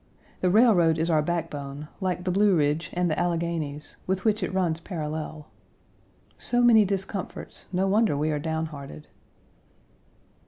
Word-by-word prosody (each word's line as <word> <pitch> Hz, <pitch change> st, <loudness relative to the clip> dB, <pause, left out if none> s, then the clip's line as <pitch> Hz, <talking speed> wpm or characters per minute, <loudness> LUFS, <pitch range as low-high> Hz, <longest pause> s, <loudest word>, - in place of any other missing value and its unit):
The 185 Hz, -, +2 dB
railroad 180 Hz, -6 st, +5 dB
is 165 Hz, +2 st, 0 dB
our 155 Hz, -1 st, +4 dB
backbone, 150 Hz, -3 st, -4 dB
like 185 Hz, -2 st, -2 dB
the 185 Hz, -, 0 dB
Blue 200 Hz, +1 st, +4 dB
Ridge 150 Hz, +1 st, +1 dB
and 180 Hz, 0 st, +1 dB
the 155 Hz, -, -1 dB
Alleghanies, 165 Hz, -4 st, -2 dB
with 190 Hz, +1 st, -1 dB
which 215 Hz, -1 st, +2 dB
it 180 Hz, -, -2 dB
runs 175 Hz, -4 st, 0 dB
parallel. 155 Hz, -3 st, -5 dB, 0.9 s
So 245 Hz, 0 st, +1 dB
many 225 Hz, -3 st, +6 dB
discomforts, 195 Hz, 0 st, -4 dB
no 190 Hz, +1 st, +1 dB
wonder 205 Hz, -5 st, +2 dB
we 155 Hz, +2 st, 0 dB
are 150 Hz, -, -1 dB
down 160 Hz, +1 st, -2 dB
hearted. 140 Hz, -, -9 dB
170 Hz, 150 wpm, -26 LUFS, 155-190 Hz, 0.9 s, many